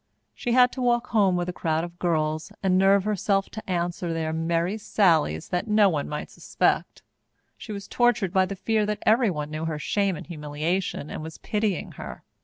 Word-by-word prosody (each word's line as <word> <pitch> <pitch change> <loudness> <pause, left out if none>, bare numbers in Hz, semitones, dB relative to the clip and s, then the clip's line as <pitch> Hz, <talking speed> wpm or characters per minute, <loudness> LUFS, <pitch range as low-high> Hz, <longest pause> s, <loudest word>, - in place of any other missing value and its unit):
She 240 - -2
had 250 0 +6
to 260 - -6
walk 240 -1 +1
home 200 -5 +3
with 175 0 -1
a 180 - -3
crowd 160 -1 -1
of 175 0 -8
girls 155 -2 -1
and 185 -1 +3
nerve 195 +1 +4
herself 200 -1 0
to 220 -2 -8
answer 175 -1 -1
their 160 -1 -2
merry 170 +5 0
sallies 160 - +2
that 180 +5 -1
no 210 -2 +5
one 150 -5 -2
might 150 0 -5
suspect. - - -1 0.5
She 220 - -9
was 200 -1 -6
tortured 240 -7 +1
by 190 -1 +3
the 200 - -5
fear 215 +2 0
that 210 0 -3
everyone 195 - +2
knew 155 +1 -3
her 160 -2 -2
shame 195 +4 0
and - - -8
humiliation 155 +1 -3
and - - -5
was 160 0 -8
pitying 210 -4 -2
her. - - -8
185 Hz, 195 wpm, -25 LUFS, 160-210 Hz, 0.5 s, had